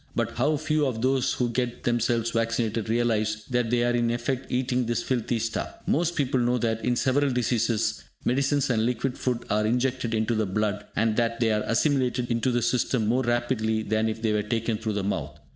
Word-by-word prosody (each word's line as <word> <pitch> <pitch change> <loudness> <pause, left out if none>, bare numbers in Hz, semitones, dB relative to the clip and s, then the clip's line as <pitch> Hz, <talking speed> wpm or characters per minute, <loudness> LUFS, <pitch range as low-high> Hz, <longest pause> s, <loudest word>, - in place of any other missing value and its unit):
But - - 0
how 150 0 +2
few 155 -1 +1
of 115 -3 -3
those 130 -1 +2
who 125 -1 0
get 125 0 -2
themselves 120 -1 +1
vaccinated 115 -1 -1
realise 110 -2 0
that 120 -2 +1
they 120 0 +2
are 120 - +2
in 120 -1 +1
effect 125 +2 -2
eating 125 -1 0
this 120 0 -1
filthy 120 -2 -1
stuff! 115 0 -3
Most 170 +2 +1
people 135 -3 +1
know 120 +1 +2
that, 115 -2 -1
in 125 - +1
several 140 +3 +2
diseases, 115 -3 0 0.2
medicines 135 +2 +1
and 110 -2 +1
liquid 125 +2 -1
food 125 -2 -2
are 105 +1 +2
injected 125 0 0
into 110 +2 +1
the 110 -2 0
blood, 105 +1 -1
and 110 0 +1
that 115 0 0
they 115 -2 +2
are 105 0 +1
assimilated 125 0 +1
into 115 +2 +1
the 120 -1 +1
system 120 -1 +1
more 120 +5 +2
rapidly 120 -3 0
than 110 +1 0
if 110 +1 -5
they 110 -1 +2
were 105 - +1
taken 115 +1 -1
through 110 -1 -2
the 100 -1 -2
mouth. 100 - -3
120 Hz, 205 wpm, -26 LUFS, 110-125 Hz, 0.2 s, how